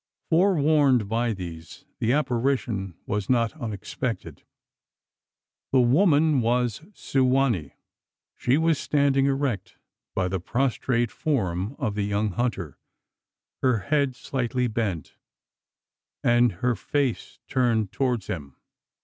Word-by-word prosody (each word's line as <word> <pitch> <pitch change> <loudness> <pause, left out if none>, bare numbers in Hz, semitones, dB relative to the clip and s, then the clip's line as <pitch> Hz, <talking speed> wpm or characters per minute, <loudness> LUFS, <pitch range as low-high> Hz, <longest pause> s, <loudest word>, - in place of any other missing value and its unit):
Forewarned 150 - +4
by 115 +2 0
these, 85 -5 -8
the 115 - +1
apparition 120 - 0
was 105 -3 -2
not 120 -2 +2
unexpected. 115 +2 -4 1.3
The 135 - +4
woman 150 +1 +4
was 120 0 0
Su 135 -1 0
wa 135 +2 +3
nee! 85 - -3 0.6
She 125 +3 +2
was 160 -2 +2
standing 140 -2 +2
erect 135 -6 -2 0.4
by 90 - +1
the 95 +1 -2
prostrate 120 +2 0
form 100 - -1
of 125 -9 -2
the 105 - -2
young 100 +1 0
hunter 95 - -3 0.8
her 130 -3 +3
head 140 +4 0
slightly 125 0 -2
bent, 105 -8 -3 1.1
and 120 0 +4
her 125 - +3
face 135 +3 -2
turned 115 -6 +1
towards 125 -6 -1
him. 70 -6 -6
120 Hz, 115 wpm, -25 LUFS, 105-135 Hz, 1.3 s, Forewarned